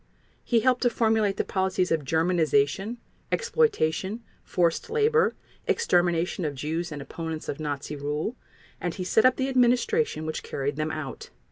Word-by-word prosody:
He 235 -2 +2
helped 255 0 +2
to 245 - +4
formulate 220 -3 +1
the - - +1
policies 190 -1 0
of 160 -2 +1
Germanization, 160 - +1 0.3
exploitation, 240 - +1 0.2
forced 170 - 0
labor, 455 +1 +3 0.3
extermination 175 - +1
of 150 -3 -2
Jews 160 +5 -3
and 145 -2 -5
opponents 160 +1 -6
of 140 - -4
Nazi 145 -1 -4
rule, 150 - -3 0.4
and 175 -2 -3
he 185 - -4
set 215 +5 +3
up 255 - +6
the 265 - -1
administration 250 - +2
which 155 - -3
carried 140 +1 -3
them 155 +1 -1
out. 155 -3 -6
180 Hz, 150 wpm, -26 LUFS, 155-240 Hz, 0.4 s, up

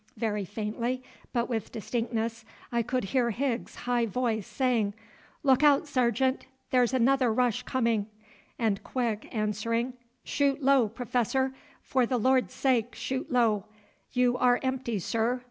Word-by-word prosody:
Very 210 -2 -1
faintly 230 +6 -3 0.3
but 240 -1 0
with 225 -4 -3
distinctness 230 0 -2 0.3
I 235 -1 +2
could 250 +2 -1
hear 235 +4 +1
Higgs's 240 +1 -2
high 240 -1 +1
voice 220 -1 -1
saying, 235 -6 0 0.5
"Look 270 -1 +4
out, 295 +1 +5
Sergeant, 260 -1 +1 0.2
there's 250 -2 +4
another 260 -1 +3
rush 245 0 +1
coming!" 230 -5 0 0.5
and 215 -4 0
Quick 230 -5 -2
answering, 230 +3 -1 0.3
"Shoot 280 0 0
low, 265 -5 +4
Professor; 250 +3 0 0.3
for 255 -2 +1
the 250 - +1
Lord's 255 +2 +2
sake 245 -3 +1
shoot 265 +3 -3
low. 225 -5 +2 0.5
You 250 -1 +2
are 245 -1 +4
empty, 260 -4 -1
sir. 230 +6 0
245 Hz, 135 wpm, -28 LUFS, 225-260 Hz, 0.5 s, out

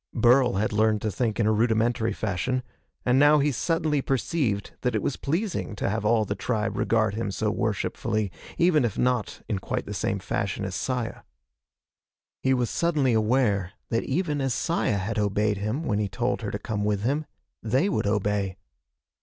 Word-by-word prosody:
Burl 125 +2 +5
had 105 +2 0
learned 110 0 +3
to 110 - 0
think 110 +2 -1
in 110 - +3
a 110 - +3
rudimentary 115 +1 +2
fashion 110 +5 -1 0.4
and 125 +1 +4
now 145 +1 +6
he 145 0 +2
suddenly 155 +2 0
perceived 130 -6 -1
that 125 -3 0
it 105 - 0
was 135 - 0
pleasing 165 - -2
to - - -2
have 110 +2 -1
all 110 0 +3
the 100 - -2
tribe 110 0 -2
regard 110 -3 +1
him 110 -1 -2
so 95 - -1
worshipfully, 105 -3 -1 0.3
even 170 -5 +4
if 115 -5 -1
not 125 -3 0
in 105 -4 -1
quite - - -3
the 105 - -5
same 105 0 -1
fashion 100 +1 -2
as 95 - -4
Saya. 125 +3 -2 1.2
He 130 - +2
was 125 -2 +1
suddenly 150 -7 +2
aware 110 -4 +2 0.2
that 115 - +1
even 150 -1 -1
as 135 -3 0
Saya 165 -11 0
had 105 +3 -2
obeyed 105 0 +1
him 110 +10 -2
when 105 -9 0
he 105 -2 -1
told 125 +5 -1
her 105 - -3
to 105 - -3
come 105 0 -3
with 105 -1 0
him, 145 +6 0 0.3
they 130 - +1
would 200 - 0
obey. 100 -2 0
115 Hz, 185 wpm, -26 LUFS, 105-130 Hz, 1.2 s, now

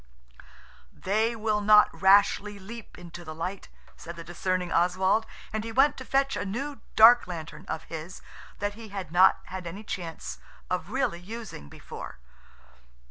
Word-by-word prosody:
"They 220 +4 0
will 215 -1 0
not 210 0 +7
rashly 200 +1 +4
leap 215 +4 -10
into 175 -1 -10
the 155 -1 -8
light," 180 +4 -5 0.3
said 170 +1 -9
the 165 - -8
discerning 180 +1 -2
Oswald. 185 +5 +2 0.3
And 215 0 -2
he 225 - -5
went 270 +5 +4
to 260 - -8
fetch 275 +1 +1
a - - -2
new 270 +9 -4
dark 235 +2 +8
lantern 165 -4 -7
of 160 - -4
his 165 +2 -8 0.4
that 205 0 -2
he 225 +1 -10
had 190 -5 -6
not 185 +2 +5
had 185 -1 -7
any 195 +6 -7
chance 165 - -6 0.3
of - - -2
really 170 - -1
using 205 - -9
before. - - -9
195 Hz, 155 wpm, -27 LUFS, 175-220 Hz, 0.4 s, dark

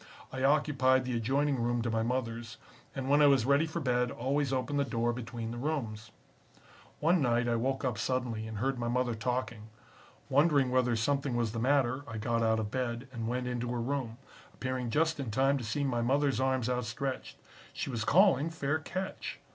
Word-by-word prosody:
I 130 - -4
occupied 135 -2 +3
the 125 -1 -2
adjoining 135 +3 +1
room 120 0 0
to 115 - -1
my 110 0 +1
mother's, 115 -1 -3 0.4
and 135 -1 -3
when 145 +2 +4
I 145 - +7
was 135 -5 +4
ready 140 +4 +3
for 160 +2 -4
bed 125 -4 +1
always 135 +3 -1
opened 135 +2 -1
the - - +3
door 120 -3 0
between 115 -1 -5
the 120 - -5
rooms. 115 -7 -3 0.9
"One 165 +2 +3
night 120 -2 +2
I 120 - +2
woke 135 +3 -1
up 120 -4 -1
suddenly 120 -3 -2
and 110 -1 -6
heard 130 +3 -1
my 120 - -2
mother 125 0 0
talking. 115 -1 -3 0.6
Wondering 140 -2 +3
whether 125 -2 +2
something 140 +3 0
was 115 -2 0
the 115 - -4
matter, 130 +1 +2
I 115 - -6
got 115 +2 0
out 110 0 +3
of 105 -1 -3
bed 125 0 -3
and 115 -2 -4
went 125 +1 -2
into 125 -1 -2
her 120 - -2
room, 120 -2 -2 0.4
appearing 130 -2 -3
just 160 +5 +1
in 135 -4 -3
time 135 +5 +2
to - - -6
see 115 +7 -2
my 125 -4 0
mothers 135 +3 +1
arms 130 -2 +1
outstretched. 125 +2 -3 0.3
She - - -4
was 115 -3 -2
calling 165 - +4
'Fair 155 -1 -1
catch.' 185 +4 -5
125 Hz, 195 wpm, -31 LUFS, 115-140 Hz, 0.9 s, I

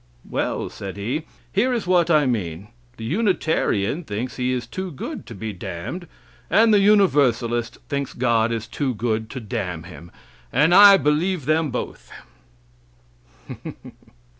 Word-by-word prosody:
"Well," - - -2
said 100 -1 -7
he, 130 +11 -3 0.3
"here 235 +7 +2
is 230 - -2
what 175 -2 +3
I 155 -3 +4
mean: 100 -6 -2 0.3
the 115 - -8
Unitarian 160 - 0
thinks 120 0 -5
he 125 0 0
is 125 -2 -2
too 185 +10 -5
good 145 - -7
to 115 - -9
be 110 +1 -5
damned, 90 - -6 0.4
and 220 +1 +5
the 205 - +6
Universalist 130 - +3
thinks 140 -1 -3
God 115 -2 +2
is 115 -1 -2
too 130 +1 -2
good 110 -1 -2
to 135 - -6
damn 90 -6 -4
him, 85 -1 -12 0.4
and 150 +7 +3
I 200 +1 +9
believe 150 +2 0
them 155 0 +2
both." 125 - -6
130 Hz, 140 wpm, -22 LUFS, 110-175 Hz, 0.4 s, I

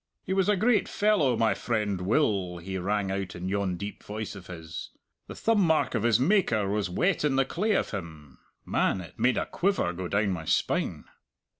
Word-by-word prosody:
'He 190 - -2
was 195 +1 +2
a 210 - +4
great 220 +3 +2
fellow 185 - +2
my 115 -1 +3
friend 105 -5 -1
Will,' 95 - +1
he 95 +2 -5
rang 100 +1 -1
out 95 -2 -3
in 90 +1 -5
yon 95 -2 -1
deep 100 +3 -6
voice 110 0 -5
of 95 -2 -11
his. 80 -2 -7 0.4
'The - - -8
thumb 225 -2 +2
mark 160 -4 +2
of - - 0
his 115 0 +3
Maker 130 - +2
was 100 -2 -1
wet 175 - +1
in 145 -3 +2
the 135 0 +3
clay 210 +10 0
of - - 0
him.' 80 -8 -8 0.3
Man, - - +1
it 85 - -13
made 125 +1 +3
a - - 0
quiver 190 - 0
go 90 0 -4
down 100 +2 +1
my 85 -3 -4
spine." - - 0
105 Hz, 200 wpm, -28 LUFS, 90-150 Hz, 0.4 s, a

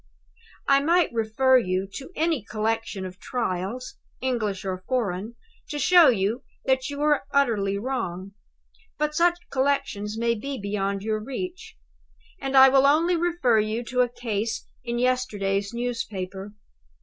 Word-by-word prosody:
I 275 0 +5
might 335 0 +2
refer 235 +4 +3
you 185 -3 -1
to 270 - -8
any 320 -4 +1
collection 215 -1 -2
of 185 +1 -9
Trials, 230 +1 -3 0.2
English 215 -7 -2
or 185 -1 -4
foreign, 220 -3 -2 0.3
to 295 - -3
show 345 0 +6 0.6
that 260 +1 +1
you 285 - -5
were 295 -2 +2
utterly 220 -9 +1
wrong. 195 -6 -3 0.7
But 300 0 0
such 345 +2 +3
collections 260 -6 -1
may 235 0 +1
be 270 +4 -5
beyond 200 -1 -2
your 215 0 -1
reach; 350 - -6 0.6
and 270 0 0
I 265 0 +10
will 270 +1 +5
only 330 +5 +3
refer 330 -9 +2
you 215 +3 -1
to 250 0 +2
a 245 - +2
case 225 -2 -3 0.2
in 240 -1 -3
yesterday's 210 -6 0
newspaper. 210 -5 -4
235 Hz, 135 wpm, -25 LUFS, 205-275 Hz, 0.7 s, I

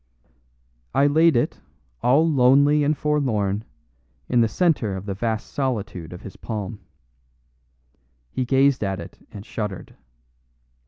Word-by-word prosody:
I 140 - +4
laid 160 +2 +4
it, 120 - -1 0.4
all 140 +7 +4
lonely 140 +1 +4
and 145 +1 +1
forlorn, 110 -9 0 0.6
in 120 -1 +3
the 115 - +4
center 120 - +1
of 95 +1 -6
the 100 - -3
vast 110 +2 -3
solitude 105 - -3
of 90 - -10
his 100 - -10
palm. 105 -2 -5 1.5
He 130 - -1
gazed 135 0 +3
at 95 -1 -2
it - - -10
and 100 0 -9
shuddered. 105 -6 -5
120 Hz, 125 wpm, -23 LUFS, 100-140 Hz, 1.5 s, I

